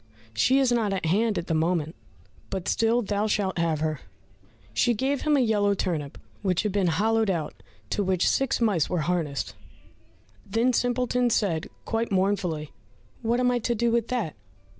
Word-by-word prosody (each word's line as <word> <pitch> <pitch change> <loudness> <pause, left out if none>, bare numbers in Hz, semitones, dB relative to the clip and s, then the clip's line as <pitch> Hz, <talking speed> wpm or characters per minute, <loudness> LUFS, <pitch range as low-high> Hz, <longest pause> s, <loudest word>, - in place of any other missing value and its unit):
She 255 - +3
is 265 -2 +3
not 225 -4 +1
at 190 - -2
hand 210 +6 +2
at 170 - -2
the 165 - -2
moment, 160 -1 0 0.6
but 190 -2 -4
still 230 +1 +2
thou 205 +1 0
shalt 195 -4 0
have 160 -2 0
her." 155 -2 -1 0.7
She 240 -1 +2
gave 270 +5 0
him 300 -2 +3
a - - +3
yellow 205 -4 +2
turnip 155 -7 -3 0.2
which 185 -1 +1
had 210 - 0
been 195 -2 +1
hollowed 220 +6 +2
out, 165 -5 -3 0.3
to - - 0
which 185 -2 +1
six 270 -1 +1
mice 205 - +2
were 180 -3 0
harnessed. 155 -4 -2 0.9
Then 230 +5 +1
Simpleton 245 0 +1
said 185 -7 0 0.2
quite 225 0 -1
mournfully, 185 -6 0 0.5
"What 235 +1 +1
am 250 0 +3
I 245 - +1
to 240 +1 -1
do 235 +1 +1
with 235 -1 +1
that?" 235 - -2
205 Hz, 175 wpm, -26 LUFS, 170-235 Hz, 0.9 s, She